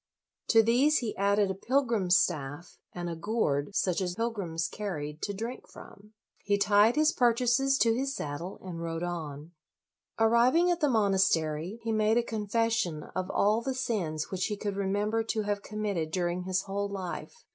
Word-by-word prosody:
To 225 -1 +6
these 260 +7 +4
he 230 -4 -3
added 200 0 +2
a - - -1
pilgrim's 225 -4 +2
staff, 150 0 -2
and 175 -1 -5
a 170 - -3
gourd 165 -3 -1
such 185 0 +1
as 180 -1 -2
pilgrims 195 -8 -2
carried 155 -7 -5
to 205 - -2
drink 230 +5 -6
from. 210 +2 -14 0.3
He 205 0 +2
tied 205 +3 +4
his 310 +1 +4
purchases 250 +3 +2
to 230 -3 +3
his 270 +3 -2
saddle, 150 +6 -5
and 175 -3 -6
rode 165 0 -3
on. 160 -3 -5 0.7
Arriving 240 +10 +4
at 350 - 0
the 295 - +2
monastery, 190 - +1
he 225 - -1
made 215 +1 +2
a 240 - +3
confession 220 -6 -1
of 185 0 -2
all 210 +3 +2
the 265 +2 -3
sins 180 -12 -2
which 185 -1 -1
he 210 - -3
could 205 0 -3
LOYOLA 200 0 -2
59 - - -1
remember 210 +3 0
to 220 -1 -1
have 205 0 -2
committed 205 -7 -3
during 175 +1 -2
his 185 0 0
whole 200 +1 -3
life. 195 - -6
205 Hz, 180 wpm, -29 LUFS, 175-230 Hz, 0.7 s, To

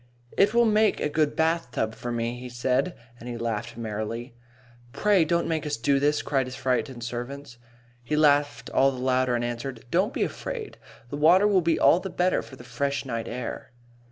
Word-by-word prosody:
"It 205 +3 +3
will 235 0 +5
make 215 0 +3
a - - 0
good 150 0 +1
bathtub 160 -9 0
for 120 - -6
me," 120 +1 -2
he 125 0 -7
said, 130 +7 0 0.2
and 120 - -8
he 120 - -4
laughed 115 0 -3
merrily. 115 +2 -4 0.6
"Pray 205 -4 +3
don't 170 +2 0
make 160 -2 -1
us 150 -1 -2
do 140 +4 +2
this," 145 +1 +1
cried 135 -3 0
his 130 - -7
frightened 130 -1 -1
servants. 120 +1 -6 0.4
He 135 +6 -1
laughed 145 -1 +2
all 135 - +4
the 130 - -7
louder, 130 -1 +1
and 120 0 -1
answered: 120 0 -5
"Don't 185 +4 +2
be - - -1
afraid. 480 -4 -5 0.3
The 145 - -3
water 175 +7 +5
will 195 -3 +4
be 165 -1 +1
all 170 - +5
the 190 +1 -5
better 180 +1 +1
for 130 - -12
the 125 - -13
fresh 140 +4 -2
night 115 -3 -4
air." 125 +1 -6
135 Hz, 195 wpm, -26 LUFS, 120-160 Hz, 0.6 s, will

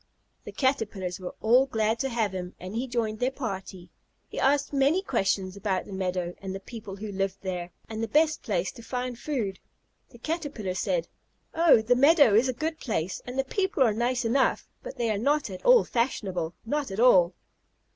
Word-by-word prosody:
The - - -7
Caterpillars 215 -9 -1
were 180 -1 -7
all 245 +5 +5
glad 220 -2 0
to 270 - -1
have 225 -5 0
him, 180 -1 -6
and 185 +2 -7
he 245 +3 -2
joined 225 -3 -2
their 250 - +2
party. 190 -8 -6 0.4
He - - -6
asked 280 +2 +2
many 285 +7 +3
questions 195 - 0
about 200 -2 -1
the 200 - -9
meadow, 180 -2 -2
and 190 -1 -5
the - - -5
people 205 -1 -9
who 210 +1 -6
lived 195 0 -2
there, 180 -2 -4 0.2
and 220 0 -5
the 225 - -1
best 305 +5 +2
place 185 -4 -1
to - - -12
find 250 +1 -4
food. 225 -11 -3 0.5
The 240 - -15
Caterpillars 260 - -3
said, - - 0 0.5
"Oh, 325 -9 +5
the 245 +3 +3
meadow 285 - +6
is 235 +5 +4
a - - 0
good 315 +5 -3
place, 185 -7 -2
and 250 +1 -6
the 270 - +2
people 380 +3 +1
are 225 -4 +3
nice 245 +2 0
enough, 260 +4 +1
but 275 - -8
they 235 -2 0
are 205 - -1
not 285 -1 +1
at 185 - -8
all - - +7
fashionable 190 -9 -2
not 290 +2 -1
at 195 +2 -5
all." 185 -8 +5
225 Hz, 195 wpm, -27 LUFS, 195-270 Hz, 0.5 s, all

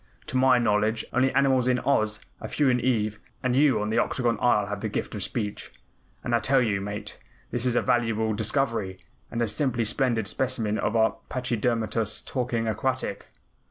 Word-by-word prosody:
To - - -7
my 130 0 +5
knowledge, 110 -1 +1
only 130 +2 +3
animals 135 -2 +3
in 125 -1 +3
Oz, 110 -6 +1 0.2
a - - -6
few 145 -3 +1
in 125 -1 +1
Ev 110 -4 0 0.2
and 130 -1 +1
you 140 -3 +4
on 105 +1 -2
the - - +2
Octagon 120 -3 0
Isle 105 -5 +3
have 100 0 -5
the 110 - -2
gift - - -3
of 105 - -4
speech. 105 +1 -3 0.5
And 120 - -2
I 120 - +4
tell 135 +5 +3
you, 105 -5 +1
Mate, 100 +1 -6 0.3
this 120 +1 0
is 120 - +1
a - - +2
valuable 110 -2 +1
discovery, 110 -3 -1 0.3
and 120 0 -1
a - - 0
simply 120 +1 0
splendid 115 -2 0
specimen 115 -5 0
of 110 - -1
a 110 0 +4 0.2
pachydermatous 115 -3 -1
talking 120 -3 -2
aquatic." 120 0 -2
115 Hz, 185 wpm, -26 LUFS, 105-130 Hz, 0.5 s, my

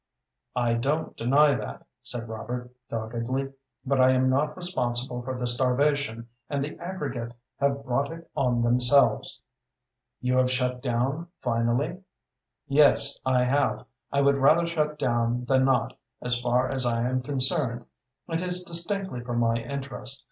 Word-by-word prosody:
"I 120 -1 +1
don't 140 +7 -1
deny 140 +5 +4
that," 65 - -6 0.2
said 120 -1 -6
Robert, 120 +3 -6 0.2
doggedly, 120 +4 -3 0.3
"but 135 0 +2
I 130 0 +6
am 130 0 +3
not 150 +5 0
responsible 125 -8 -1
for 130 +1 -5
the 125 - -2
starvation, 125 -1 +1 0.2
and 140 -1 -1
the 150 - -5
aggregate 140 -10 -5 0.3
have 140 0 0
brought 135 +4 0
it 165 0 -10
on 120 -3 +1
themselves." 125 +3 +4 0.8
"You 125 0 0
have 130 0 +3
shut 125 -1 -1
down 135 +6 -1
finally?" 120 +8 0 0.7
"Yes, 140 -1 +4
I 125 -1 +3
have. 140 +3 +1 0.3
I 140 - +2
would 140 0 +4
rather 155 +5 +4
shut 150 -2 -1
down 120 -2 0
than 130 0 +3
not, 135 -1 +1 0.2
as 125 0 -1
far 125 +1 +2
as 135 -1 0
I 120 0 0
am 130 0 0
concerned. 130 -2 +1 0.4
It 165 0 -2
is 180 0 +1
distinctly 175 -3 -2
for 120 0 -4
my 115 -1 +2
interest. 130 +2 -3
130 Hz, 150 wpm, -26 LUFS, 120-140 Hz, 0.8 s, I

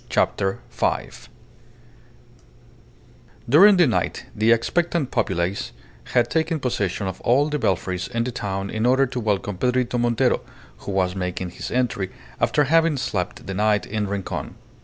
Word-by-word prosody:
CHAPTER 95 0 +1
FIVE - - -2 2.2
During 190 - +7
the 175 - +6
night 120 - -1
the 110 +2 +3
expectant 160 +5 +1
populace 90 - -1 0.3
had 120 -1 +2
taken 160 +1 0
possession 105 -7 -1
of 95 -1 -5
all 140 +5 +3
the 150 0 -1
belfries 95 -3 -1
in 115 -1 -1
the 125 - -3
town 100 -4 -4
in 110 +2 0
order 130 +2 +4
to 125 -1 -4
welcome 105 -3 -1
Pedrito 125 0 +1
Montero, 120 -1 +2 0.4
who 100 - -7
was 95 -1 0
making 90 -1 -3
his - - -6
entry 120 -7 -1 0.3
after 150 - +3
having 165 +1 +3
slept 95 -7 -3
the 95 - -4
night 105 +1 +1
in 105 0 -2
Rincon. 100 -1 -4
115 Hz, 145 wpm, -23 LUFS, 95-130 Hz, 2.2 s, During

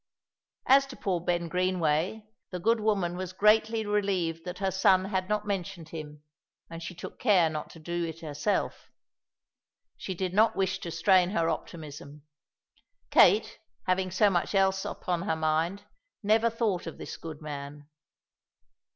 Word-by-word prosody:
As 275 +1 +5
to 265 - -9
poor 185 -7 -1
Ben 175 0 -1
Greenway, 180 +2 0 0.2
the 180 - -5
good 225 +5 +2
woman 200 -5 0
was 185 -1 -5
greatly 220 +2 +3
relieved 190 -6 -1
that 180 0 -5
her 195 -1 -1
son 190 0 +4
had 190 -1 -2
not 210 0 0
mentioned 190 -4 -4
him, 150 -2 -8 0.5
and 165 0 -7
she 170 +2 -7
took - - -9
care 185 -9 +4
not 155 -1 -5
to 165 - -13
do 170 +2 -3
it 165 0 -7
herself. 155 +6 -2 1.1
She 190 - -5
did 185 0 -3
not 220 +2 +4
wish 190 -1 0
to 170 - -6
strain 180 +2 +3
her 165 -4 +1
optimism. 150 -2 -7 0.9
Kate, - - +5 0.3
having 185 0 +1
so 200 +3 +3
much 175 +2 0
else 195 0 +2
upon 175 -2 -3
her 165 -4 -1
mind, 160 +5 0 0.4
never 220 +3 +3
thought 220 -7 -1
of 165 - -7
this - - -7
good 160 -2 -8
man. 145 -1 -8
180 Hz, 155 wpm, -28 LUFS, 165-200 Hz, 1.1 s, As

